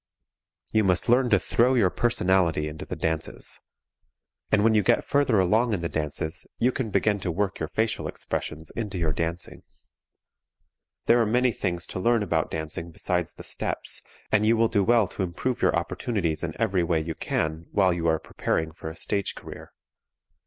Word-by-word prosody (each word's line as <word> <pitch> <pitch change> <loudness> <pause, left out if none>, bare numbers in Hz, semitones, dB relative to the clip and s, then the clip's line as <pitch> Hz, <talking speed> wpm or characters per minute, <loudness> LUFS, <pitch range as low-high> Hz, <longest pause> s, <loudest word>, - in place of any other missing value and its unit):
You 110 - +3
must 90 0 +2
learn 125 +1 +4
to 105 - +5
throw 125 +7 +2
your 100 -7 +3
personality 95 -9 +2
into 75 0 -7
the - - -4
dances. 80 -1 -2 0.9
And 105 -1 +4
when 115 0 +4
you 105 - +4
get 95 - +2
further 140 -7 +2
along 110 +6 +3
in 95 - -1
the 85 - -2
dances 80 +1 -2
you 125 +2 +2
can 125 -3 -3
begin 105 0 +1
to 95 - -3
work 100 +2 -1
your 80 - -2
facial 110 +3 0
expressions 80 +1 -4
into 105 -5 -4
your 80 -3 0
dancing. 85 +3 -3 1.4
There 120 0 +5
are - - +3
many 125 +3 +3
things 90 -5 -2
to - - -5
learn 115 +2 +2
about 85 -5 0
dancing 80 +1 -4
besides 90 +1 -2
the - - -10
steps, - - -2 0.3
and 105 -1 +3
you 115 +2 +4
will 115 0 +3
do 100 -2 +2
well 115 -1 +4
to 95 - -6
improve 95 +8 -2
your - - +3
opportunities 85 - -1
in 80 +1 -4
every 100 -5 +2
way 85 -1 +1
you 80 +1 -3
can 80 +1 -2
while 95 -3 +3
you 85 -1 -1
are 80 0 +3
preparing 80 +1 -2
for 80 0 -7
a 80 - -9
stage 100 -2 0
career. - - -10
95 Hz, 185 wpm, -26 LUFS, 80-110 Hz, 1.4 s, to